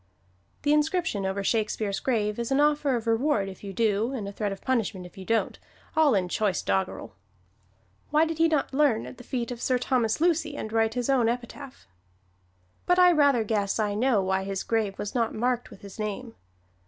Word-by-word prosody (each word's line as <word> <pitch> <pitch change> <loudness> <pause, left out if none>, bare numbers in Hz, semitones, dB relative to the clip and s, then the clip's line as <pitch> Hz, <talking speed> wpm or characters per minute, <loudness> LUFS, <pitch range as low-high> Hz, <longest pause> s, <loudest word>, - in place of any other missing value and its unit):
The 295 0 +3
inscription 300 - 0
over 195 +1 -2
Shakespeare's 215 -1 -1
grave 215 -4 -1
is 235 +2 -3
an 270 - +3
offer 295 -2 +2
of 230 -1 -3
reward 225 -2 +1
if 190 +1 -10
you 200 - -6
do, 220 +3 0
and 220 -7 -4
a - - -5
threat 205 0 -3
of 195 - -6
punishment 220 -7 -1
if 180 - -13
you 190 - -9
don't, 225 +2 0 0.4
all 310 -6 +4
in 185 -2 +1
choice 195 +1 0
doggerel. 190 -1 -2 1.0
Why 305 +2 +4
did 325 0 -4
he 330 - +5
not 305 -4 0
learn 270 -6 +2
at - - -10
the - - -10
feet 245 -1 -3
of 240 -1 -6
Sir 255 - +2
Thomas 245 -2 0
Lucy 320 -3 +1
and 220 - -5
write 225 0 +1
his 245 -1 -1
own 255 -4 +3
epitaph? 250 - -6 1.0
But 355 - +4
I 360 -1 +7
rather 285 -7 +4
guess 205 -2 -1
I 210 -2 0
know 220 -2 +2
why 190 0 0
his 195 0 -3
grave 220 -4 -1
was 205 - -5
not 230 -3 0
marked 245 +2 -1
with - - -14
his 200 +2 -11
name. 215 +3 -4
230 Hz, 205 wpm, -26 LUFS, 205-275 Hz, 1.0 s, I